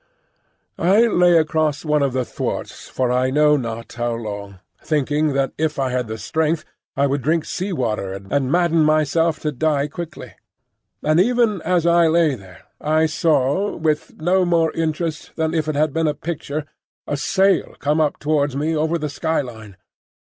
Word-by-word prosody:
I 195 +6 +4
lay 180 -7 +4
across 155 -2 0
one 150 -1 +2
of 140 -2 +1
the 130 -1 -1
thwarts - - -5
for 125 -1 -1
I 125 +1 +2
know 150 +2 +4
not 115 -4 -5
how 120 0 -2
long, 100 -4 -6 0.3
thinking 150 0 0
that 135 0 0
if 155 -1 0
I 135 -2 0
had 125 -2 -1
the 110 0 -5
strength 160 +6 -1 0.3
I 140 - +3
would 140 0 0
drink 160 +5 +1
sea 190 +2 -3
water 110 - -2
and 125 +8 -2
madden 170 -2 +3
myself 155 +1 +2
to 150 - -1
die 145 +1 0
quickly. 165 +1 -8 0.7
And 155 +2 +3
even 225 -2 +2
as 175 0 +1
I 170 -1 +5
lay 160 -2 +3
there 95 -5 -12 0.2
I 155 +1 +2
saw, 155 +3 +1
with 155 -2 -2
no 180 +4 +2
more 165 -2 +2
interest 160 -1 -3
than 160 0 -1
if 160 -2 0
it 155 - -1
had 150 0 +1
been 165 -1 +1
a 150 - 0
picture, 155 -1 -4 0.4
a 145 - -2
sail 190 +7 +1
come 150 +2 +1
up 150 -2 +1
towards 145 -2 0
me 155 +3 0
over 160 +2 0
the 155 -2 -3
sky 160 +2 -1
line. 110 -7 -10
155 Hz, 175 wpm, -21 LUFS, 135-165 Hz, 0.7 s, I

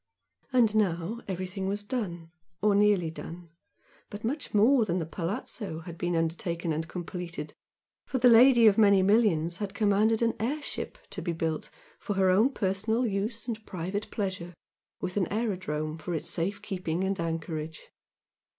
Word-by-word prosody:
And 230 -4 +4
now 200 +2 0
everything 190 0 -3
was 205 +1 -2
done, 175 -8 -4 0.3
or 210 0 +3
nearly 200 -5 +3
done; 170 +1 -9 0.6
but 205 +1 -8
much 280 +6 -2
more 230 +5 +5
than 180 -4 -1
the 165 - -1
"palazzo" 170 +1 -4
had 170 -1 -9
been 175 0 0
undertaken 165 0 -1
and 160 +2 -3
completed, 175 0 -6 0.5
for 260 - -1
the 250 0 +5
lady 240 0 +7
of 215 0 +6
many 200 -3 +6
millions 185 -6 +3
had 200 -1 -5
commanded 215 +2 +3
an 230 - +2
air 260 +8 -1
ship - - -5
to - - -4
be 170 - -2
built 160 -1 -2 0.3
for 205 - -3
her 190 -1 +4
own 215 +8 +5
personal 215 +3 0
use 220 +2 -2
and 220 -2 -4
private 190 +4 -4
pleasure 185 -4 -4 0.5
with 185 - -3
an 185 -4 0
aerodrome 180 -8 -2
for 175 +2 -3
its 155 - -2
safe 185 +4 -1
keeping 180 -2 -2
and 195 -1 -1
anchorage. 160 -1 -4
195 Hz, 160 wpm, -28 LUFS, 170-215 Hz, 0.6 s, lady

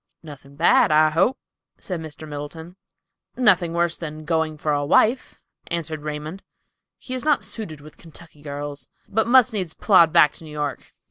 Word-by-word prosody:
"Nothing 140 -2 -13
bad, 215 - +4
I 155 0 +4
hope," 170 - +2 0.4
said 180 -3 -5
Mr. 155 0 -9
Middleton. 155 +4 -8 0.6
"Nothing 190 -9 +3
worse 170 0 0
than 155 -1 -7
going 160 -1 -1
for 150 0 -1
a 145 0 0
wife," 225 - +2 0.3
answered 160 -2 -4
Raymond. 150 +5 -6 0.6
"He 255 - -8
is 255 - -4
not 295 -8 +2
suited 185 -6 -7
with 155 +1 -15
Kentucky 165 -2 -14
girls, 145 -2 -7 0.2
but 220 +2 0
must 250 -1 +5
needs 185 -6 -3
plod 175 -6 +5
back 150 - +6
to - - -13
New 155 - -11
York." 150 -1 -5
160 Hz, 165 wpm, -22 LUFS, 150-190 Hz, 0.6 s, back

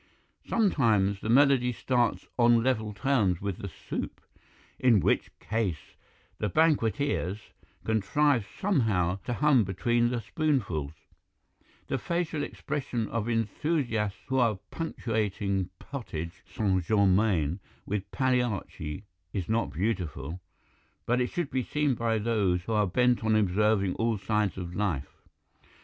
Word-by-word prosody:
Sometimes 110 - +2
the 110 - -4
melody 130 -1 +5
starts 120 0 0
on 120 -1 +5
level 110 -4 0
terms 100 -4 +1
with 100 -1 -4
the 100 - -5
soup, 85 - -6 0.6
in 125 -5 +5
which - - +1
case 105 -8 -3 0.4
the 105 - 0
banqueters 115 - +1 0.3
contrive 115 +3 +2
somehow 105 - +1
to 120 - -1
hum 140 -3 +4
between 120 +6 +1
the 120 -1 -1
spoonfuls; 110 - -1 0.9
the 135 - -2
facial 170 0 -2
expression 135 -8 -3
of 115 0 -2
enthusiasts 115 -2 0
who 130 0 0
are 115 -5 +2
punctuating 105 - -2
potage 90 - -6
St. 95 -5 0
Germain 95 -4 +2 0.3
with 100 -1 -3
Pagliacci 120 - -1 0.3
is 95 -5 -2
not 115 +1 +1
beautiful, 85 -4 -3 0.6
but 125 +2 +2
it 125 - +1
should 170 -5 -3
be 130 0 +1
seen 150 +2 0
by 115 -1 0
those 105 -5 +1
who 115 - -3
are 105 -2 +3
bent 125 +5 +2
on 110 0 +3
observing 105 -1 +2
all 115 -1 +1
sides 105 -1 0
of 90 -2 -5
life. 85 -8 -2
110 Hz, 125 wpm, -28 LUFS, 95-125 Hz, 0.9 s, melody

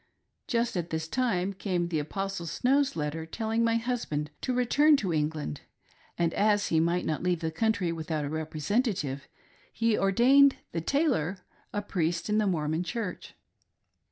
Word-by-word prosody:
Just 235 -2 0
at 175 -1 -2
this 160 0 -3
time 200 -4 0
came 185 -3 -1
the 160 -3 0
Apostle 195 +3 -4
Show's 270 - +1
letter 155 +1 -3
telling 225 +5 -1
my 230 0 +2
husband 225 -11 -2
to 255 - -1
return 280 +5 +4
to 190 -9 -1
England; 150 - -2 0.6
and 170 -1 +1
as 205 0 +2
he 160 - +3
might 170 +2 +1
not 155 - -1
leave 180 -2 +1
the 160 -1 -1
country 205 -1 0
without 160 -2 -3
a - - -3
representative, 155 - -1 0.4
he 230 -1 +1
ordained 260 +9 +5 0.2
the 165 - -2
tailor 195 - +1 0.3
a 205 - -2
Priest 170 -2 -1
in 210 +1 +2
the 210 - +2
Mormon 160 -2 0
Church. 185 +2 -5
180 Hz, 155 wpm, -28 LUFS, 160-230 Hz, 0.6 s, ordained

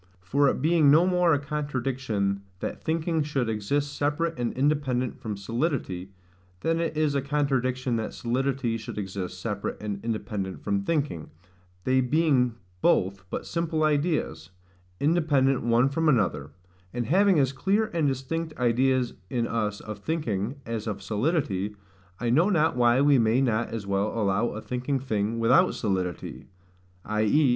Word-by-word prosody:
For 140 +9 +2
it 130 - -2
being 160 -2 +4
no 160 +5 +6
more 180 -2 +3
a 145 - +4
contradiction 130 -9 -2 0.2
that - - -5
thinking 160 0 0
should 145 -5 -1
exist 140 +7 -1
separate 150 +3 0
and 120 -1 0
independent 130 -3 0
from 105 -3 -5
solidity, 115 - -2 0.5
than 165 0 +1
it 165 -2 -2
is 155 -2 +2
a 140 - +1
contradiction 130 -3 0
that 110 - -3
solidity 125 -1 -1
should 110 - -8
exist 95 -2 -4
separate 105 0 -3
and 100 -2 -5
independent 105 -4 -4
from 200 -1 0
thinking, 150 - -2 0.5
they 130 +3 +3
being 130 -3 +2 0.3
both 95 +1 +2
but - - -4
simple 165 -1 -1
ideas, 155 +1 0 0.5
independent 145 -4 +2
one 120 +2 +3
from 155 +3 +1
another 115 -10 +1 0.4
and 120 -1 -2
having 190 - +4
as 135 -2 +2
clear 200 +10 +1
and 160 -4 +2
distinct 150 +5 -3
ideas 125 +1 +2 0.2
in 120 -2 0
us 105 -3 -2
of 105 -1 -7
thinking 120 -5 -2
as 115 -1 -4
of 100 -2 -4
solidity, 105 - -1 0.4
I 120 -1 0
know 165 +10 +4
not 160 -7 +2
why 120 +1 +4
we 140 -2 +5
may 115 +2 +3
not 120 -3 +1
as 115 -3 -5
well 100 +1 0
allow 105 +2 +1
a 110 - -5
thinking 125 +2 -2
thing 110 -3 -1
without 125 +11 +4
solidity, 90 - -3 0.6
i.e. 110 +7 +3
130 Hz, 150 wpm, -26 LUFS, 110-150 Hz, 0.6 s, no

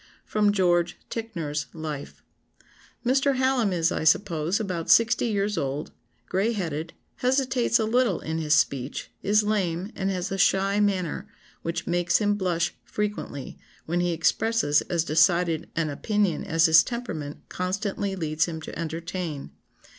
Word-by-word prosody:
[Sidenote: 210 -1 +2
George 175 -3 +2
Ticknor's 165 -11 -3
Life.] 155 -3 -6 0.8
"Mr. 270 +2 +3
Hallam 260 -5 +2
is, 170 -1 +1
I - - -2
suppose, 165 +1 +2
about 180 -6 -3
sixty 230 +1 +5
years 205 -1 0
old, 140 +3 -3 0.4
gray 200 +5 +1
headed, 165 -5 -3 0.2
hesitates 255 -2 +2
a 220 - 0
little 235 -4 +2
in 160 +1 -3
his 155 -1 +3
speech, 135 -2 -1
is 210 +1 +3
lame, 195 -2 -1
and 195 0 -1
has 185 0 -2
a 195 - -2
shy 195 +2 +3
manner 195 -1 0 0.3
which 165 0 -3
makes 175 0 +2
him 205 -1 +2
blush 180 -4 0
frequently, 210 -10 -4 0.3
when 175 +2 -1
he 175 0 +1
expresses 170 0 +2
as 170 -2 +1
decided 165 +1 +2
an 160 -3 0
opinion 200 +2 0
as 165 0 +3
his 160 0 +7
temperament 170 - -5
constantly 195 +1 -2
leads 160 -3 0
him 165 -2 -5
to - - -8
entertain. 165 -2 -4
180 Hz, 145 wpm, -26 LUFS, 160-210 Hz, 0.8 s, his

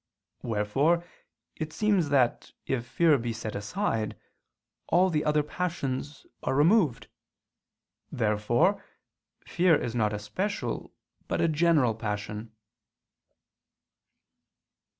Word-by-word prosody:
Wherefore 135 +11 +1 0.5
it 155 -1 -4
seems 200 -5 +1
that, 130 -4 +1
if 125 -2 -2
fear 155 +1 +3
be 115 0 -3
set 110 -1 -5
aside, 110 - -2 0.7
all 185 +2 +3
the 150 -2 +1
other 150 0 +2
passions 145 -4 -4 0.2
are - - -1
removed. 155 - +3 1.0
Therefore 115 - +1 0.6
fear 175 -1 +3
is 115 - -3
not 110 -3 +1
a 105 - -2
special 190 - -3 0.4
but - - -1
a - - +3
general 155 -6 +3
passion. 105 0 -5
140 Hz, 100 wpm, -28 LUFS, 110-170 Hz, 1.0 s, fear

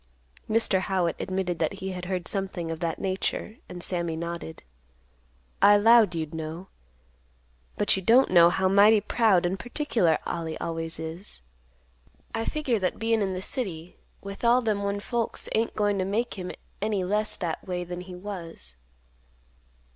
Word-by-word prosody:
Mr. 220 -3 +2
Howitt 185 -3 0
admitted 185 -3 -2
that 160 +3 0
he 190 -1 -5
had 180 -1 -6
heard 180 -2 -3
something 190 -4 -2
of 165 - -5
that 165 -1 -2
nature; 195 +3 -2
and 175 -1 -7
Sammy 170 -3 -2
nodded, 170 -1 -6 1.0
"I 205 +1 +8
'lowed 220 -3 +6
you'd 160 -2 -3
know. 160 +3 -6 1.1
But 205 - +3
you 190 - -2
don't 235 +6 +5
know 170 -2 +8
how 190 +2 +1
mighty 205 +3 +6
proud 210 -4 +3
and 185 +2 -1
particular 230 - +1
Ollie 165 -2 -3
always 165 0 -4
is. 160 - -7 0.9
I 225 - -2
figure 275 -8 0
that 185 -1 -1
bein' 225 -1 +1
in 190 -2 0
the 185 - -4
city 180 - -3 0.2
with 200 +2 -8
all 240 +2 +4
them 215 -3 0
one 200 0 -2
folks 235 +1 -3
ain't 225 +1 0
goin' 205 -1 +1
to - - +1
make 220 +5 -1
him 180 -2 -5 0.3
any 205 -2 0
less 210 +3 0
that 170 +1 -4
way 180 -1 -2
than 175 0 -6
he 180 0 -9
was. 170 - -8
190 Hz, 160 wpm, -27 LUFS, 170-210 Hz, 1.1 s, I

